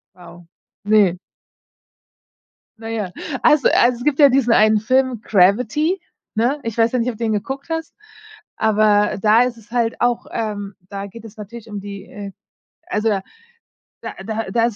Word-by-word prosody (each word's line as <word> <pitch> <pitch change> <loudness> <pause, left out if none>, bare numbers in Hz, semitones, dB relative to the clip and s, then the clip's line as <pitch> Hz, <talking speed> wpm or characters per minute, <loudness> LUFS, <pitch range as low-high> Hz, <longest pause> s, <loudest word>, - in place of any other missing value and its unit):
Wow, 175 -1 -14 0.4
ne? 205 -4 +4 1.6
Na 225 0 -8
ja, 210 -5 -3 0.3
also 300 -3 +5
also, 240 0 +3
es - - -7
gibt 295 -1 0
ja 285 -2 +8
diesen 250 -3 +3
einen 215 0 +5
Film, 255 0 +1
„Gravity“, 235 - +2 0.4
ne? 250 +7 +1
Ich 230 0 -5
weiß 230 0 +3
ja 250 - 0
nicht, 240 +2 0
ob 230 - -5
du 235 - -4
den 220 -1 +1
geguckt 270 +8 -4
hast, 325 0 -4 0.6
aber 210 -2 +2
da 220 +3 +5
ist 245 -2 -3
es 225 +1 -19
halt 235 -2 0
auch, 245 -1 +1
ähm 205 -3 -4
da 200 0 -5
geht 225 +3 -12
es 220 -1 -13
natürlich 225 +2 -10
um 205 -1 -5
die, 200 0 -8
äh 200 -1 -8 0.6
also, 215 +1 0 0.9
da - - -6
da 225 +1 -3
da 230 -1 +2
ist 235 - -1
225 Hz, 170 wpm, -20 LUFS, 205-245 Hz, 1.6 s, ja